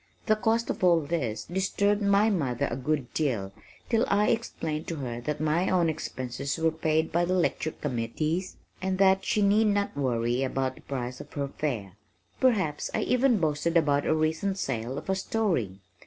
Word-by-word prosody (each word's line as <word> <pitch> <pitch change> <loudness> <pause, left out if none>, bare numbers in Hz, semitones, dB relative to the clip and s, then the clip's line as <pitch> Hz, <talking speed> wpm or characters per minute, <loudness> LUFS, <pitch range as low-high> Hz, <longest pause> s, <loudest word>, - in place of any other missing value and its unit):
The 215 - +4
cost 225 +2 +1
of - - -6
all 170 -2 +5
this 140 -8 -2
disturbed 200 +3 +1
my 200 +2 +4
mother 135 - 0
a - - -1
good 135 -1 -2
deal 115 -11 -1 0.3
till 230 -1 +2
I 205 +1 +3
explained 165 -9 -2
to 165 - -3
her 120 -5 -5
that 150 +4 -3
my 155 +4 +1
own 175 -3 +3
expenses 140 -2 -4
were 160 0 +2
paid 160 0 0
by 170 +1 +2
the 180 +2 +1
lecture 170 -3 +1
committees 155 +7 -3 0.2
and 190 0 -1
that 190 0 +4
she 210 - +1
need 210 +2 +4
not 205 -4 0
worry 120 -2 0
about 130 0 -1
the - - -16
price 125 -2 -5
of - - -13
her 140 -1 -2
fare. 110 -11 -4 0.4
Perhaps 195 - +1
I - - +1
even 250 -1 +3
boasted 165 0 +1
about 145 -3 +2
a 155 - +3
recent 160 +5 0
sale 130 -5 -3
of 145 - -7
a 190 - +2
story! 185 - -1
160 Hz, 185 wpm, -28 LUFS, 135-190 Hz, 0.4 s, all